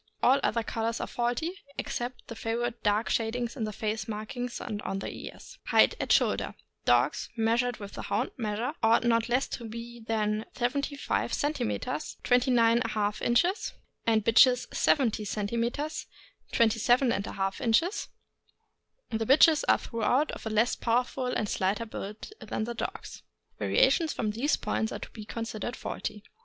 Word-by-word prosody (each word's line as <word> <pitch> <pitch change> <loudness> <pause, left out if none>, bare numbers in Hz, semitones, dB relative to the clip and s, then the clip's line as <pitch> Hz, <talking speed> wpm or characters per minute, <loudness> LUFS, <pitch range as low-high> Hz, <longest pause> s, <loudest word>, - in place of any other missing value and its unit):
All 265 +3 +6
other 230 0 +1
colors 225 +1 -2
are - - -2
faulty, 245 +8 -1 0.2
except 245 +1 -4
the - - -6
favorite 235 +1 -2
dark 210 +2 +2
shadings 235 +2 -1
in 230 -5 -2
the 215 - -3
face 215 0 -3
markings 235 +3 -4
and 210 -3 -4
on 195 - -3
the 195 - -5
ears. - - -10
Height - - +5
at - - -1
shoulder. - - +2 0.2
— - - -47
Dogs - - +2
(measured 230 +2 +1
with 200 -1 -9
the - - -6
Hound - - -1
measure) 230 +3 -2
ought 225 +1 +4
not 230 -1 +3
to 245 0 -1
be 230 +2 -7
less 225 - -16
than 215 -1 0
75 280 +3 -1
centimeters, 155 - -2
(29£ 230 -4 +2
inches), 350 - +2 0.3
and 220 -2 +3
bitches 245 +2 +5
70 230 -7 +2
centimeters 235 +9 -2 0.4
(27J 225 -4 +2
inches). 320 - +2 1.0
The 225 0 -1
bitches 305 +3 +6
are - - +6
throughout 250 +6 0
of - - -7
a - - -1
less 220 +2 +2
powerful 245 +2 0
and 220 -4 -1
slighter 200 +4 0
build 215 - -7
than - - -3
the 235 +2 -3
dogs. 235 - -6 0.4
Variations 345 -10 +3
from 215 -3 -1
these 250 +8 +1
points 220 - -1
are - - -3
to - - -9
be 215 -2 -9
considered 230 +1 -4
faulty. 210 - -5
230 Hz, 150 wpm, -29 LUFS, 215-245 Hz, 1.0 s, All